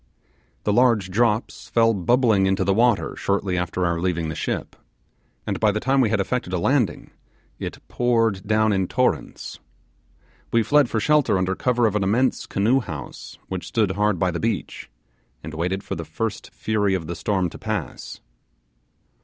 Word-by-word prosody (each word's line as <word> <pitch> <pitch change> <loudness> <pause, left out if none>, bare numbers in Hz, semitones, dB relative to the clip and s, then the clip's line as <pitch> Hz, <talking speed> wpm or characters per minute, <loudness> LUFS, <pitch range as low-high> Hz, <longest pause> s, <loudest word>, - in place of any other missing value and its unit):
The 105 - +1
large 115 -5 +3
drops 110 +2 0
fell 115 -1 +3
bubbling 105 0 +3
into 95 0 +1
the 95 +1 +2
water 115 +1 +2
shortly 100 -2 -1
after 90 0 -1
our 85 -1 0
leaving 85 -3 -1
the 80 - -4
ship, - - -3 0.7
and - - -2
by 110 -1 +3
the 110 - -2
time 135 +3 +2
we 115 - +2
had 110 -1 +1
affected 100 -1 -2
a - - +1
landing 120 +2 0 0.5
it - - -5
poured 115 -5 +1
down 110 0 +3
in 95 -2 0
torrents. 125 +5 -1 0.9
We 115 -1 +3
fled 145 0 +3
for 110 - 0
shelter 150 -3 +3
under 95 0 0
cover 120 +3 +1
of 105 -2 +1
an 105 - +1
immense 120 +7 +1
canoe 115 +7 +2
house 75 - -8
which 95 -2 -5
stood 110 -5 +1
hard 105 0 +1
by 90 +1 +1
the 85 - -3
beach, 110 - -3 0.5
and 80 +1 -7
waited 90 +5 -2
for - - -5
the 85 - -4
first 95 +8 -4
fury 105 -3 0
of 90 -4 -3
the 85 +2 -5
storm 95 -4 -1
to - - -11
pass. - - -5
105 Hz, 175 wpm, -23 LUFS, 95-115 Hz, 0.9 s, large